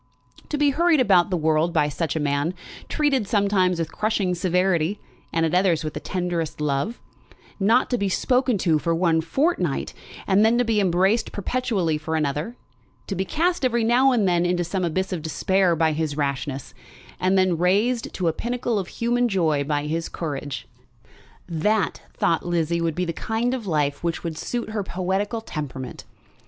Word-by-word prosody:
To 300 Hz, -, -1 dB
be 290 Hz, -1 st, +3 dB
hurried 335 Hz, +1 st, +3 dB
about 190 Hz, -8 st, +4 dB
the 185 Hz, -, 0 dB
world 160 Hz, +1 st, +2 dB
by 150 Hz, -2 st, +3 dB
such 150 Hz, +2 st, -2 dB
a -, -, 0 dB
man, 145 Hz, +4 st, 0 dB, 0.3 s
treated 275 Hz, -8 st, +1 dB
sometimes 200 Hz, -4 st, +2 dB
with 165 Hz, -1 st, -3 dB
crushing 210 Hz, -4 st, 0 dB
severity, 180 Hz, 0 st, +1 dB, 0.3 s
and 165 Hz, 0 st, +1 dB
at 160 Hz, -, -1 dB
others 180 Hz, -3 st, +2 dB
with 155 Hz, -, -4 dB
the -, -, -4 dB
tenderest 175 Hz, -4 st, -3 dB
love, 150 Hz, +10 st, -1 dB, 0.6 s
not 220 Hz, +6 st, +3 dB
to 245 Hz, -, +1 dB
be 200 Hz, -1 st, 0 dB
spoken 250 Hz, +3 st, +1 dB
to 160 Hz, -3 st, +3 dB
for 165 Hz, +2 st, 0 dB
one 165 Hz, -2 st, +2 dB
fortnight, 290 Hz, -, 0 dB, 0.3 s
and 195 Hz, +2 st, +4 dB
then 225 Hz, +2 st, +4 dB
to 245 Hz, -, +2 dB
be 225 Hz, -2 st, +2 dB
embraced 195 Hz, +4 st, +2 dB
perpetually 200 Hz, -8 st, -1 dB
for 160 Hz, +1 st, -3 dB
another, 150 Hz, -, -1 dB, 0.5 s
to 200 Hz, -, -4 dB
be 190 Hz, -, -1 dB
cast 345 Hz, -, 0 dB
every 235 Hz, -2 st, +2 dB
now 250 Hz, +4 st, +4 dB
and 225 Hz, -6 st, +2 dB
then 175 Hz, -1 st, +2 dB
into 175 Hz, 0 st, +1 dB
some 185 Hz, +2 st, -2 dB
abyss 185 Hz, +3 st, -1 dB
of 170 Hz, -, -3 dB
despair 175 Hz, +3 st, +1 dB
by 160 Hz, 0 st, +2 dB
his 155 Hz, -1 st, -2 dB
rashness, 140 Hz, -2 st, -3 dB, 0.5 s
and 185 Hz, +1 st, +2 dB
then 185 Hz, -2 st, +3 dB
raised 210 Hz, +7 st, +1 dB
to 180 Hz, -, -1 dB
a 165 Hz, -, +2 dB
pinnacle 240 Hz, 0 st, -2 dB
of 185 Hz, -, -4 dB
human 240 Hz, +1 st, 0 dB
joy 160 Hz, -8 st, +1 dB
by 145 Hz, 0 st, -1 dB
his 165 Hz, +2 st, -2 dB
courage, 145 Hz, -4 st, -5 dB, 0.8 s
that, 190 Hz, +5 st, 0 dB
thought 165 Hz, -, +1 dB
Lizzie, 170 Hz, -1 st, 0 dB
would 165 Hz, -2 st, -1 dB
be 180 Hz, -, -1 dB
the 170 Hz, -, -3 dB
kind 225 Hz, +7 st, -1 dB
of 240 Hz, -6 st, -4 dB
life 145 Hz, -3 st, 0 dB
which 170 Hz, -1 st, -2 dB
would 165 Hz, -2 st, -3 dB
suit 235 Hz, +6 st, -4 dB
her 215 Hz, -1 st, -1 dB
poetical 195 Hz, +5 st, -2 dB
temperament. 140 Hz, -, -6 dB
180 Hz, 180 wpm, -23 LUFS, 160-220 Hz, 0.8 s, about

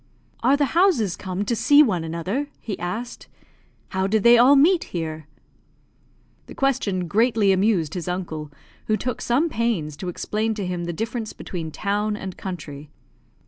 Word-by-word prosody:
"Are 265 Hz, +4 st, +4 dB
the 290 Hz, -, +2 dB
houses 325 Hz, -, +3 dB
come 190 Hz, +1 st, -4 dB
to 235 Hz, -, 0 dB
see 290 Hz, +6 st, +6 dB
one 185 Hz, -, 0 dB
another?" 180 Hz, -, -3 dB
he 210 Hz, -4 st, -6 dB
asked. 220 Hz, +8 st, -5 dB, 0.6 s
"How 190 Hz, 0 st, -1 dB
did 215 Hz, 0 st, +1 dB
they 235 Hz, 0 st, +8 dB
all 250 Hz, +4 st, +7 dB
meet 330 Hz, +6 st, +4 dB
here?" 160 Hz, -3 st, -5 dB, 1.2 s
The -, -, -11 dB
question 215 Hz, -10 st, 0 dB
greatly 220 Hz, 0 st, +3 dB
amused 190 Hz, -5 st, +1 dB
his 180 Hz, -2 st, -5 dB
uncle, 160 Hz, -5 st, -4 dB, 0.4 s
who 215 Hz, -, +2 dB
took 250 Hz, +1 st, -4 dB
some 265 Hz, +8 st, +2 dB
pains 225 Hz, -, -1 dB
to 180 Hz, +3 st, -5 dB
explain 215 Hz, +5 st, -2 dB
to 205 Hz, -3 st, -3 dB
him 180 Hz, -1 st, -3 dB
the 170 Hz, -, -2 dB
difference 225 Hz, +5 st, -4 dB
between 165 Hz, -4 st, -6 dB
town 205 Hz, +5 st, -1 dB
and 190 Hz, -3 st, -6 dB
country. 150 Hz, -6 st, -7 dB
205 Hz, 160 wpm, -23 LUFS, 175-235 Hz, 1.2 s, they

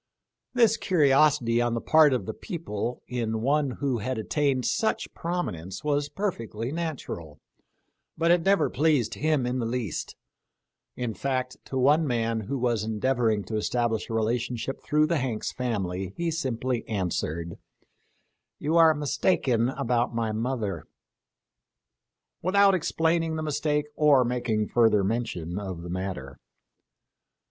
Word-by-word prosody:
This 230 Hz, -3 st, +4 dB
curiosity 140 Hz, -7 st, +3 dB
on 120 Hz, -1 st, 0 dB
the -, -, 0 dB
part 155 Hz, +3 st, +5 dB
of 130 Hz, -, 0 dB
the 110 Hz, -, -4 dB
people 125 Hz, -, -5 dB
in 115 Hz, -3 st, -2 dB
one 140 Hz, +3 st, +2 dB
who 130 Hz, -1 st, -2 dB
had 130 Hz, +4 st, -3 dB
attained 130 Hz, +3 st, 0 dB
such 220 Hz, +1 st, 0 dB
prominence 150 Hz, -, -4 dB
was 145 Hz, -1 st, 0 dB
perfectly 125 Hz, -, -3 dB
natural, 140 Hz, -, -5 dB, 0.8 s
but 165 Hz, +1 st, +3 dB
it 175 Hz, -1 st, +4 dB
never 195 Hz, +3 st, +3 dB
pleased 145 Hz, -6 st, +1 dB
him 155 Hz, -4 st, +1 dB
in 125 Hz, +1 st, -1 dB
the 115 Hz, -, -1 dB
least; 115 Hz, -7 st, -3 dB, 0.8 s
in 120 Hz, -3 st, -3 dB
fact, 130 Hz, +1 st, -2 dB
to 130 Hz, -, -4 dB
one 145 Hz, +5 st, +4 dB
man 115 Hz, -2 st, 0 dB
who 110 Hz, +6 st, -3 dB
was 120 Hz, -4 st, 0 dB
endeavoring 110 Hz, -1 st, 0 dB
to 110 Hz, -, -3 dB
establish 115 Hz, 0 st, -1 dB
a -, -, -4 dB
relation 120 Hz, +2 st, 0 dB
ship 135 Hz, +3 st, -5 dB
through 150 Hz, 0 st, +3 dB
the 165 Hz, -1 st, +1 dB
Hanks 125 Hz, -5 st, -2 dB
family 95 Hz, -6 st, -3 dB
he 170 Hz, -1 st, -1 dB
simply 130 Hz, -6 st, -2 dB
answered, 85 Hz, -4 st, -3 dB, 0.5 s
" -, -, -47 dB
You 155 Hz, +3 st, 0 dB
are 160 Hz, -2 st, +6 dB
mistaken 140 Hz, -4 st, +1 dB
about 120 Hz, -2 st, 0 dB
my 115 Hz, -1 st, 0 dB
mother," 110 Hz, -7 st, -3 dB, 1.5 s
without 195 Hz, +2 st, +4 dB
explaining 165 Hz, -2 st, +1 dB
the 155 Hz, -, -3 dB
mistake 150 Hz, 0 st, 0 dB
or 145 Hz, -4 st, +5 dB
making 120 Hz, -3 st, -1 dB
further 110 Hz, -4 st, +4 dB
mention 100 Hz, -5 st, -2 dB
of 95 Hz, -4 st, -6 dB
the 85 Hz, -, -6 dB
matter. 90 Hz, -8 st, -5 dB
125 Hz, 140 wpm, -27 LUFS, 110-150 Hz, 1.5 s, are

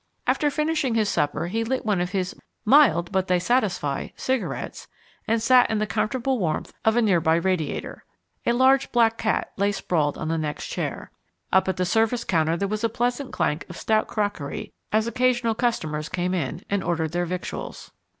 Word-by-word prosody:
After 295 Hz, -, +2 dB
finishing 300 Hz, -4 st, 0 dB
his 215 Hz, -2 st, +2 dB
supper 150 Hz, -2 st, 0 dB
he 220 Hz, +6 st, -1 dB
lit 255 Hz, +2 st, -2 dB
one 205 Hz, -4 st, +1 dB
of 180 Hz, -, -1 dB
his 185 Hz, -1 st, -2 dB, 0.3 s
"mild 245 Hz, -9 st, +5 dB
but 190 Hz, -1 st, 0 dB
they 180 Hz, -, +3 dB
satisfy" 180 Hz, -, 0 dB
cigarettes 260 Hz, -2 st, -3 dB, 0.4 s
and 230 Hz, +1 st, +2 dB
sat 250 Hz, +2 st, +5 dB
in 220 Hz, -, 0 dB
the 215 Hz, -, +1 dB
comfortable 255 Hz, +4 st, -1 dB
warmth 160 Hz, -5 st, -2 dB
of 220 Hz, 0 st, +3 dB
a 240 Hz, -, +3 dB
near 185 Hz, -6 st, +3 dB
by 160 Hz, 0 st, +3 dB
radiator. 170 Hz, -3 st, -2 dB, 0.4 s
A 235 Hz, -, +4 dB
large 265 Hz, +2 st, +4 dB
black 230 Hz, -2 st, +3 dB
cat 220 Hz, -, 0 dB
lay 200 Hz, +1 st, +2 dB
sprawled 155 Hz, -7 st, 0 dB
on 155 Hz, -, -4 dB
the 165 Hz, 0 st, 0 dB
next 150 Hz, -2 st, -3 dB
chair. -, -, -4 dB, 0.4 s
Up 190 Hz, 0 st, +4 dB
at 190 Hz, -, -1 dB
the 180 Hz, -, +1 dB
service 225 Hz, +5 st, +1 dB
counter 165 Hz, -1 st, +1 dB
there 200 Hz, -, -1 dB
was 215 Hz, +2 st, -3 dB
a 230 Hz, -, +2 dB
pleasant 245 Hz, +4 st, -1 dB
clank 150 Hz, +3 st, -1 dB
of -, -, -8 dB
stout 220 Hz, -1 st, +1 dB
crockery 205 Hz, -9 st, -3 dB, 0.2 s
as 215 Hz, +1 st, +2 dB
occasional 240 Hz, -1 st, +1 dB
customers 155 Hz, -11 st, -1 dB
came 180 Hz, 0 st, -1 dB
in 170 Hz, 0 st, -3 dB
and 200 Hz, -1 st, -1 dB
ordered 160 Hz, -2 st, -1 dB
their 175 Hz, +1 st, -1 dB
victuals. 180 Hz, +1 st, -6 dB
205 Hz, 190 wpm, -24 LUFS, 175-235 Hz, 0.4 s, mild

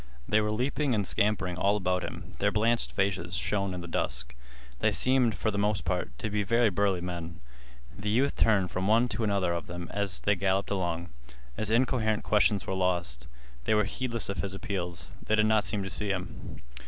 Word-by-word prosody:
They 110 Hz, +1 st, +3 dB
were 105 Hz, -, 0 dB
leaping 130 Hz, +3 st, 0 dB
and 105 Hz, -2 st, 0 dB
scampering 95 Hz, -4 st, 0 dB
all 100 Hz, +2 st, +3 dB
about 90 Hz, -2 st, 0 dB
him. -, -, -7 dB
Their -, -, +2 dB
blanched 115 Hz, +2 st, +1 dB
faces 95 Hz, -3 st, -1 dB
shone 100 Hz, +2 st, -1 dB
in 90 Hz, -, -5 dB
the 85 Hz, -, -7 dB
dusk. 65 Hz, -6 st, -2 dB, 0.5 s
They -, -, +3 dB
seemed, 125 Hz, -4 st, +3 dB
for 110 Hz, +3 st, -1 dB
the 100 Hz, -, -2 dB
most 105 Hz, 0 st, 0 dB
part, 85 Hz, -8 st, -2 dB
to 105 Hz, -, -3 dB
be 105 Hz, 0 st, +1 dB
very 115 Hz, +2 st, +3 dB
burly 95 Hz, -1 st, +1 dB
men. 85 Hz, -2 st, -5 dB, 0.6 s
The 105 Hz, +1 st, -3 dB
youth 130 Hz, +6 st, +2 dB
turned 100 Hz, -5 st, +3 dB
from 95 Hz, +1 st, -1 dB
one 115 Hz, +3 st, +4 dB
to 115 Hz, -, -2 dB
another 100 Hz, -4 st, +1 dB
of 85 Hz, -, -4 dB
them 85 Hz, -1 st, -6 dB
as 100 Hz, -3 st, -1 dB
they 105 Hz, -, +2 dB
galloped 95 Hz, +1 st, 0 dB
along. 85 Hz, -3 st, -1 dB, 0.5 s
His 110 Hz, -, -1 dB
incoherent 115 Hz, -2 st, +2 dB
questions 105 Hz, -1 st, +3 dB
were -, -, -2 dB
lost. 85 Hz, -9 st, 0 dB, 0.4 s
They 110 Hz, -, +3 dB
were 105 Hz, -, +4 dB
heedless 115 Hz, +2 st, -3 dB
of 100 Hz, -, -4 dB
his 95 Hz, -1 st, -3 dB
appeals. 90 Hz, -3 st, -4 dB
They 110 Hz, -, +1 dB
did 110 Hz, 0 st, +4 dB
not 110 Hz, -1 st, +3 dB
seem 105 Hz, -2 st, -1 dB
to 95 Hz, -, -4 dB
see 105 Hz, +2 st, -2 dB
him. 90 Hz, -2 st, -5 dB
100 Hz, 205 wpm, -29 LUFS, 90-110 Hz, 0.6 s, one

